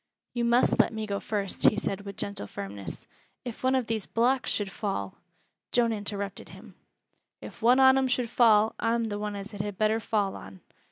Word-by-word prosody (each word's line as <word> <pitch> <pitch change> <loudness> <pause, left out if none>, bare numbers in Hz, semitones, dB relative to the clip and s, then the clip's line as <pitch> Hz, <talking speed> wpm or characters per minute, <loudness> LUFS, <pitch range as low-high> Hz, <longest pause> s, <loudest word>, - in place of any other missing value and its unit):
"You 240 -1 0
must 240 +1 +3
let - - +4
me 220 -1 -4
go 200 -1 -2
first," 200 -3 -4
he - - -6
said 195 0 -2
with 200 -1 -9
gentle 200 - -3
firmness. 100 0 -7 0.4
"If 240 -2 -7
one 260 +1 +2
of 255 -2 +1
these 220 -3 -3
blocks 250 +3 +1
should 205 -2 -1
fall 145 - -4 0.2
" - - -49
Joan 235 -2 +3
interrupted 200 -2 -4
him: - - -13 0.7
"If - - -11
one 245 +3 +5
on 265 0 +7
'em 265 - +1
should 250 -2 -1
fall, 220 -3 +5
I'm 230 0 +1
th' 205 0 -3
one 210 0 -3
as 200 +2 -7
it 200 - -4
had 205 -2 -5
better 215 +1 +2
fall 210 -3 -1
on. 95 -1 -11
215 Hz, 205 wpm, -28 LUFS, 200-235 Hz, 0.7 s, on